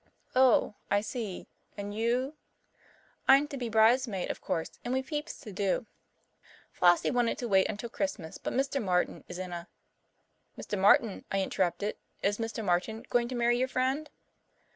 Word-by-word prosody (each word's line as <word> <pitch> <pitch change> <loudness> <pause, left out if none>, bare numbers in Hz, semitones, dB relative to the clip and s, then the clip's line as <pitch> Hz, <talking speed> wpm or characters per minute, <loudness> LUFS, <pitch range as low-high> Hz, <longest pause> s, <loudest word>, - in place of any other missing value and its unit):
"Oh, 255 -4 +5 0.2
I 205 0 +3
see 215 -4 -5 0.3
and 205 0 -5
you 240 +6 0 0.5
" - - -32
"I'm 275 +2 +6
to 285 - -5
be 245 -3 -3
bridesmaid, 220 -2 +3
of - - -8
course, 165 - -2
and 245 +2 -1
we've 265 0 -2
heaps 300 0 -4
to 215 - -9
do. 200 +2 0 0.9
Flossie 175 -1 +4
wanted 245 -2 +1
to 245 - -3
wait 190 -3 +4
until 215 +2 -4
Christmas, 220 - -4
but - - -3
Mr. 270 +1 0
Martin 180 -2 0
is - - -7
in 185 -1 -5
a 170 0 -6 0.4
" - - -44
"Mr. - - -4
Martin," 205 +3 +4
I 195 0 +1
interrupted. 190 +2 -1 0.3
"Is 205 +2 +1
Mr. 225 -1 -3
Martin 195 +5 0
going 240 -1 +3
to 255 - -5
marry 240 0 +2
your 255 - +2
friend?" 265 +4 -1
225 Hz, 170 wpm, -30 LUFS, 195-255 Hz, 0.9 s, I'm